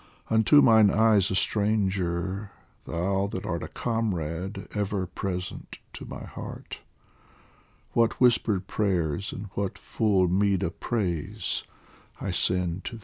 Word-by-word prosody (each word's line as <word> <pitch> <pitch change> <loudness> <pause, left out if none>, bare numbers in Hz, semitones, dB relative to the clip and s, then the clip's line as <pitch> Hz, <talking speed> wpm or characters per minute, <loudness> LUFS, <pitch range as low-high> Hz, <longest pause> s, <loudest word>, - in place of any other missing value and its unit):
Unto 110 +7 +6
mine 110 -2 +7
eyes 110 -2 +4
a 95 - -1
stranger, 95 -2 0 0.4
thou 95 +3 0
that 95 -2 -5
art 85 -1 -2
A - - -5
comrade 95 -6 -3
ever 100 -2 -1
present 90 0 -5 0.2
to - - -8
my - - -8
heart, - - -8 1.1
What 115 -1 +2
whispered 110 -6 +3
prayers 95 -4 -1
and 100 0 -7
what 100 -1 -2
full 100 -5 +1
meed 95 +1 +2
of 85 - -4
praise 100 -2 -2 0.5
I - - -3
send 90 0 0
to 115 - -5
thee. - - -13
100 Hz, 130 wpm, -27 LUFS, 90-110 Hz, 1.1 s, mine